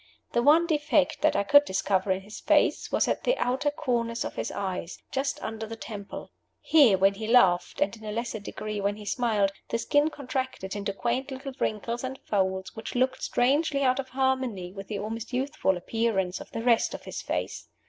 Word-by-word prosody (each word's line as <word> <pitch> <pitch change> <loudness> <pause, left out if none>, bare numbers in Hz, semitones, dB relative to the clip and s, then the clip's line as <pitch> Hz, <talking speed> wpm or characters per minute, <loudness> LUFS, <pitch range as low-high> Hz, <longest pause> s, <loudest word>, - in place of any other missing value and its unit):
The 235 - +2
one 305 +6 +6
defect 300 -3 +1
that - - +3
I 200 - +2
could 285 +8 +7
discover 190 -3 0
in 190 0 0
his 210 +2 -10
face - - +2
was - - +2
at - - -1
the - - +2
outer 265 - +1
corners 235 -5 -1
of - - -4
his - - -3
eyes, 185 -3 -4
just 270 +1 -1
under 220 0 -4
the 225 - -6
temple. 210 -3 -8 0.3
Here 275 -11 +5
when 195 +1 +4
he 215 +2 -6
laughed, 190 -7 +4
and 195 +3 +1
in 220 - -15
a 210 - -3
lesser 230 0 -3
degree 210 0 -5
when 200 +1 0
he 210 0 -10
smiled, 210 -3 +1 0.2
the 230 - 0
skin 290 +6 +2
contracted 260 -9 -4
into 200 -1 -2
quaint 245 +6 -2
little 265 0 -6
wrinkles 230 +3 -2
and 260 +1 -4
folds, 190 -2 -1
which 220 +2 -7
looked 255 +1 +1
strangely 280 +3 +2
out 255 0 +3
of 260 -1 -4
harmony 260 -9 -1
with 195 -1 -8
the 210 - -3
almost 220 +4 -5
youthful 260 -7 0
appearance 195 -2 -1
of - - -10
the 225 - -5
rest 235 -2 +3
of - - -9
his - - -6
face. - - -3
230 Hz, 200 wpm, -27 LUFS, 200-265 Hz, 0.3 s, could